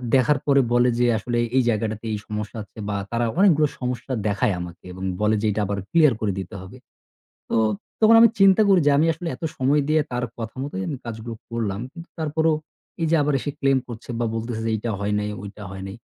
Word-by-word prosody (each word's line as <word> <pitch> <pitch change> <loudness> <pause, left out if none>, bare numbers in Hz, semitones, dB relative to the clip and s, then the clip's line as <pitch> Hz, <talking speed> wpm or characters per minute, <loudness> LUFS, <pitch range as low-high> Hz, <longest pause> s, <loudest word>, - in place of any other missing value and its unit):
দেখার 135 +2 +3
পরে 140 -1 +5
বলে 120 +1 +4
যে 125 - +4
আসলে 120 +3 -2 0.2
এই 130 - +5
জায়গাটাতে 110 0 -2
এই 105 - -2
সমস্যা 105 +1 -5
আছে 105 - -23
বা 100 - -1 0.2
তারা 120 0 +1
অনেকগুলো 155 -7 +5
সমস্যা 125 +1 -3
দেখায় 105 +1 +1
আমাকে 90 0 -9
এবং 95 +1 -8 0.2
বলে 105 +1 +3
যে 110 - -1
এটা 105 - -1
আবার 100 0 -2
clear 160 -4 +6
করে 105 -2 +1
দিতে 95 +1 -7
হবে। 95 +7 -11 0.7
তো - - +1 0.4
তখন 220 +1 +7
আমি 230 - +9
চিন্তা 195 +2 +7
করি 190 -2 +6
যে, - - +6
আমি 160 - +4
আসলে 165 +2 -6
এত - - -32
সময় 140 +3 +3
দিয়ে 155 0 +4
তার 125 0 -1
কথা 115 -1 -5
মতোই 135 -9 -4
আমি 140 - -3
কাজগুলো 115 0 -6 0.2
করলাম, 110 -4 -2
কিন্তু 170 0 -10
তারপরও 160 +1 +1 0.5
এই - - +2
যে 165 - +4
আবার 145 0 +1
এসে 145 - -3
claim 135 -1 +3
করছে 120 +1 -8
বা 120 - +1
বলতেছে 115 0 -3
যে 115 - +1
এইটা 110 +2 -3
হয় 105 +1 0
নাই, 105 0 -2
ওইটা 100 +1 -9
হয় 95 0 -7
নাই, 95 - -8
120 Hz, 220 wpm, -23 LUFS, 105-150 Hz, 0.7 s, আমি